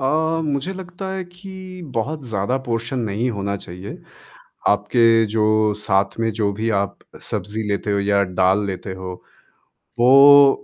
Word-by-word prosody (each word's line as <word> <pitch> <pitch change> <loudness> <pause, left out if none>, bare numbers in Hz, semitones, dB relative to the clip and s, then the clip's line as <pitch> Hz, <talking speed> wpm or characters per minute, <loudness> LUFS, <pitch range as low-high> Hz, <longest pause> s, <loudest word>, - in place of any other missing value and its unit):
अ, 160 +4 +1
मुझे 145 +4 -2
लगता 190 0 -7
है 190 -1 -3
कि 185 0 -11
बहुत 145 +7 -2
ज़्यादा 105 +4 -1
पोर्शन 120 +2 -2
नहीं 115 +2 -1
होना 100 -2 -3
चाहिए। 90 +1 -9 0.7
आपके 115 +2 +4
जो 110 -1 +2
साथ 95 -1 0
में 115 0 +1
जो 105 -1 0
भी 110 +3 -3
आप 100 - -4 0.2
सब्ज़ी 105 +2 -3
लेते 100 +1 -2
हो 100 - +1
या 100 0 +2
दाल 95 +2 +1
लेते 95 0 -5
हो। 95 0 -7 0.9
वो 140 +3 +7
115 Hz, 145 wpm, -21 LUFS, 100-140 Hz, 0.9 s, वो